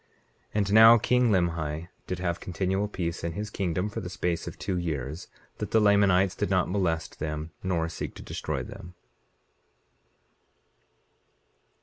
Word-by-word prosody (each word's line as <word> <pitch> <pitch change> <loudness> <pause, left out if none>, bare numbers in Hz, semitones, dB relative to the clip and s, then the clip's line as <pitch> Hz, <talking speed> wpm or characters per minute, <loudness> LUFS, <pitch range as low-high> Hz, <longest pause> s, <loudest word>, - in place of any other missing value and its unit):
19:29 - - -38 0.5
And 100 -1 +1
now 110 +2 +9
king 125 +2 +2
Limhi 85 -4 0 0.2
did 90 - -2
have 85 -1 -2
continual 95 +3 -1
peace 85 -4 -4
in 85 0 -2
his 105 +3 -5
kingdom 90 -1 -1
for 105 - -5
the 90 - -6
space 85 -2 -2
of - - -7
two 95 -2 -2
years, 80 -3 -3 0.3
that - - -3
the 110 - +4
Lamanites 100 -3 +4
did 105 - -2
not 95 -2 +2
molest 85 -5 -1
them 75 +1 -4
nor 85 -3 0
seek 85 - -6
to - - -9
destroy - - -3
them. 90 +2 -10
90 Hz, 150 wpm, -27 LUFS, 85-100 Hz, 0.5 s, now